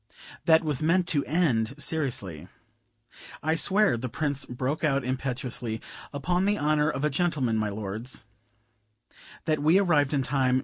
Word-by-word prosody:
"That 160 -1 +5
was 150 -3 0
meant 175 +3 +2
to 145 -4 +2
end 140 -6 +1
seriously." 115 - -2 1.0
"I 160 +1 +2
swear," 190 - +3
the 125 +2 -4
Prince 145 +1 -2
broke 130 +5 -3
out 140 -3 +2
impetuously, 125 -3 -3 0.3
"upon 175 +6 0
the 205 +1 +2
honor 150 0 +2
of 135 -2 -3
a - - +2
gentleman, 140 -7 0
my 105 -1 0
lords 110 +4 -5 0.6
" 110 +2 -22
"That 155 -2 +1
we 160 +5 +5
arrived 155 -7 +3
in 135 - +1
time. 130 -1 +2
140 Hz, 150 wpm, -27 LUFS, 125-155 Hz, 1.0 s, That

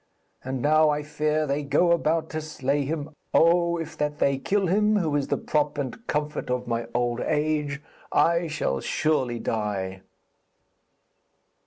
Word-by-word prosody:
And 130 -1 -3
now 155 +1 +5
I 150 0 0
fear 155 +1 0
they 140 +1 -1
go 150 +5 +2
about 160 -1 +1
to 155 - -3
slay 145 -2 -1
him. 150 +1 -3 0.2
Oh, 170 +1 +4
if 165 -2 -6
that 150 0 -1
they 140 -2 +1
kill 195 +7 +1
him, 210 +4 +3
who 165 -7 +1
is 145 -2 0
the - - 0
prop 150 -1 0
and 145 - -5
comfort 150 -2 -2
of 125 0 -1
my 115 -1 -2
old 120 0 0
age, 150 -2 -1 0.3
I 170 0 +3
shall 150 - -1
surely 130 - 0
die.' 100 -5 -3
150 Hz, 155 wpm, -25 LUFS, 135-160 Hz, 0.3 s, now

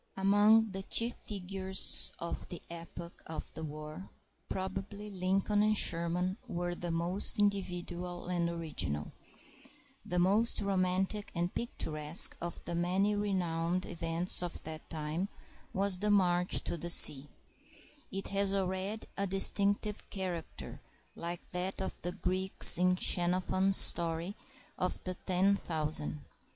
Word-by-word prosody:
Among 205 +3 +3
the 190 0 -6
chief 230 +4 +1
figures 190 -1 0
of 170 - -6
the 175 - -8
epoch 170 +1 -10
of 160 - -8
the 160 - -8
war 155 +4 -9 0.4
probably 195 +2 -6
Lincoln 195 +2 0
and 215 0 +2
Sherman 180 +4 0
were 175 -4 -4
the 175 0 -6
most 170 +4 0
individual 180 -3 -3
and 175 -1 -1
original. 155 - -3 0.9
The 180 - -4
most 200 +6 +2
romantic 195 +1 -2
and 175 +1 -2
picturesque 155 -8 +3
of 170 -1 -7
the - - -5
many 185 +4 0
renowned 180 -3 -2
events 170 +1 0
of 175 -1 -6
that 160 0 -10
time 160 +4 -4 0.4
was 195 -1 +1
the 210 +2 -1
march 180 -3 +2
to - - -4
the 175 - -6
sea. 145 -4 +7 0.8
It 195 0 -5
has 200 0 0
already 190 +3 -3
a 200 0 -2
distinctive 200 +2 +2
character, 180 -4 -7 0.3
like 170 0 -8
that 180 +2 -4
of 190 - -5
the 175 +1 -5
Greeks 185 -2 +4
in 180 0 +2
Xenophon's 185 +2 +2
story 170 +3 +6 0.4
of 180 - -2
the 185 - -4
ten 190 +2 0
thousand. 150 - 0
180 Hz, 130 wpm, -31 LUFS, 170-195 Hz, 0.9 s, sea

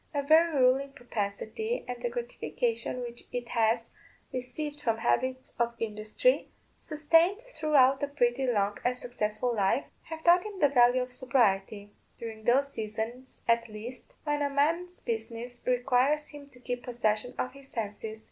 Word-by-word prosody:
a 285 - +1
very 315 +1 +5
ruling 265 +2 +4
propensity, 245 - -3
and 245 -1 -5
the 240 - 0
gratification 240 0 -2
which 240 -1 -7
it 245 -1 -4
has 230 0 +1 0.4
received 290 +4 -4
from 230 -5 +1
habits 255 +3 0
of 235 0 +1
industry, 215 - 0 0.3
sustained 330 +6 +3
throughout 300 - +3
a 285 - +1
pretty 260 -2 +1
long 205 -4 +1
and 250 0 +1
successful 240 0 -2
life, 200 +6 +2 0.2
have 320 0 -8
taught 350 +1 +6
him 415 -3 -7
the 290 - +5
value 250 -1 +5
of 250 - -9
sobriety, 210 -6 +1 0.2
during 220 -1 -7
those 275 +3 +3
seasons, 225 +4 -5
at 230 0 +2
least, 225 +4 -8
when 295 -1 0
a 285 - +1
man's 330 +6 0
business 235 +1 -4
requires 255 +4 +2
him 290 -1 -11
to 255 -3 -17
keep 245 0 -4
possession 235 -1 -1
of 255 - -2
his 275 -1 -13
senses. 220 0 -4
250 Hz, 155 wpm, -29 LUFS, 230-285 Hz, 0.4 s, taught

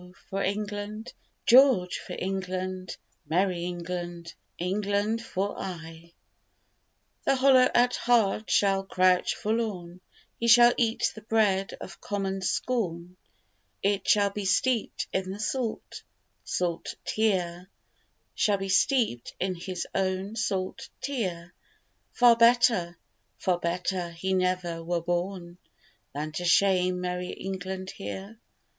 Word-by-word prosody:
for 195 +1 -1
England! 210 +3 -3 0.3
George 245 -8 +5
for - - -7
England! 185 -1 -4 0.3
Merry 175 +1 +1
England! 175 -1 -5 0.2
England 205 +4 -1
for 200 -2 -3
aye! 165 -2 -8 1.1
The - - +3
hollow 260 -1 +5
at 245 +1 +4
heart 220 -3 +2
shall 195 -1 +3
crouch 185 -1 +2
forlorn, 200 -6 -3 0.4
He 235 - 0
shall 240 +1 +8
eat 230 -2 +1
the 220 - -11
bread 210 -3 +1
of 190 - -10
common 195 -1 -3
scorn; 180 -5 -2 0.7
It 200 0 0
shall 200 -1 +4
be 205 +1 -4
steeped 230 +4 +1
in 190 0 -1
the 195 +2 -6
salt, 230 +1 -3 0.4
salt 175 -2 -2
tear, 185 -4 0 0.6
Shall 205 -1 +2
be 195 0 -5
steeped 200 - +1
in 185 0 0
his 180 0 -5
own 190 +2 -1
salt 210 +3 -2
tear: 185 -11 -4 0.6
Far 240 -1 +6
better, 230 -7 +4 0.4
far 180 -2 0
better 175 +1 -2
he 170 +3 -3
never 180 -2 0
were 170 0 -1
born 175 0 -3 0.5
Than 150 +2 -4
to 175 - -4
shame 180 0 +3
merry 180 0 -3
England 190 0 -5
here. 200 +2 -7
190 Hz, 115 wpm, -27 LUFS, 180-215 Hz, 1.1 s, shall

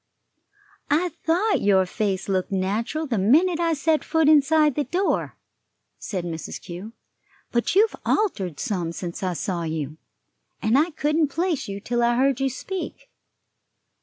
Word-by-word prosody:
"I 330 +5 +2
thought 355 +7 0
your 195 -2 +4
face 195 0 -2
looked 190 -1 -1
natural 210 +11 -1
the 235 -8 -1
minute 320 - +4
I 335 -1 +2
set 310 +1 +1
foot 320 -2 +2
inside 305 0 +5
the 295 +3 -1
door," 360 +9 -1 0.6
said 185 -4 -4
Mrs. 165 -2 -5
Kew; 190 +5 -8 0.6
"but 240 +8 0
you've 430 +3 +4
altered 195 - 0
some 175 -5 -2
since 170 0 -6
I 185 -2 -1
saw 175 +2 -3
you, 155 -2 -4 0.6
and 220 +2 +1
I 305 +5 +4
couldn't 300 0 +1
place 330 +1 -1
you 200 0 -5
till 240 +3 -1
I 235 0 +3
heard 265 +1 +2
you 270 0 +1
speak. 370 +9 -6
245 Hz, 150 wpm, -24 LUFS, 190-320 Hz, 0.6 s, inside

